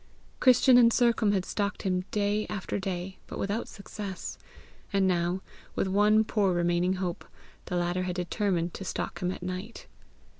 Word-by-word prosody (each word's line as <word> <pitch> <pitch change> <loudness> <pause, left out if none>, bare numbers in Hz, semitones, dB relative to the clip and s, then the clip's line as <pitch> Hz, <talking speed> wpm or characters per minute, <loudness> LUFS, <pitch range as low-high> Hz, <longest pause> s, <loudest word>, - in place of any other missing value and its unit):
Christian 255 0 +6
and 235 -1 +6
Sercombe 230 -4 +3
had 185 -1 0
stalked 200 -1 -2
him 185 -1 0
day 210 +1 0
after 200 -1 -3
day, 190 0 -4
but - - -7
without 205 +4 -2
success. 200 -2 -7 0.5
And 195 -2 +2
now, 175 +1 +1 0.3
with - - 0
one 210 +3 +4
poor 200 -4 +1
remaining 175 +1 +2
hope, 185 -2 -3 0.4
the 180 - -3
latter 175 +1 0
had 180 -1 -2
determined 180 -1 -1
to - - -6
stalk - - -4
him 180 0 -1
at 180 - -7
night. 185 +5 -6
190 Hz, 160 wpm, -28 LUFS, 180-210 Hz, 0.5 s, Christian